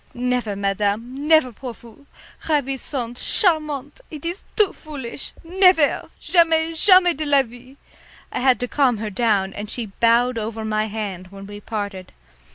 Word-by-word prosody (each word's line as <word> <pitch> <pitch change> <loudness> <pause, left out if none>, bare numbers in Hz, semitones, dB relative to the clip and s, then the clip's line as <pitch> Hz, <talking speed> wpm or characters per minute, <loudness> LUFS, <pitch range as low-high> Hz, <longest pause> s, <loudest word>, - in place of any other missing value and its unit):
"Never, 245 -4 -1
madame, 210 +7 -2
never 315 -5 +5
pour 245 +1 -8
vous. 235 +6 -17 0.4
Ravissant, 270 -4 -2
charmant 305 - 0
it 305 0 -9
is 345 +4 -4
too 420 -3 +3
foolish. 275 -5 -8
Nevair! 360 -3 +3
Jamais, 330 -2 +2
jamais 365 +1 +5
de 310 - -3
la 285 -2 +4
vie!" 245 +3 -15 0.5
I - - -3
had 255 -2 +3
to 250 - -1
calm 255 -3 +2
her 215 0 -5
down, 200 -3 +1
and 205 0 -7
she 235 0 -4
bowed 235 +1 +3
over 220 0 -5
my 215 0 0
hand 200 -4 -5
when 195 +1 -11
we 205 +1 -9
parted. 200 -4 -6
250 Hz, 155 wpm, -21 LUFS, 215-305 Hz, 0.5 s, never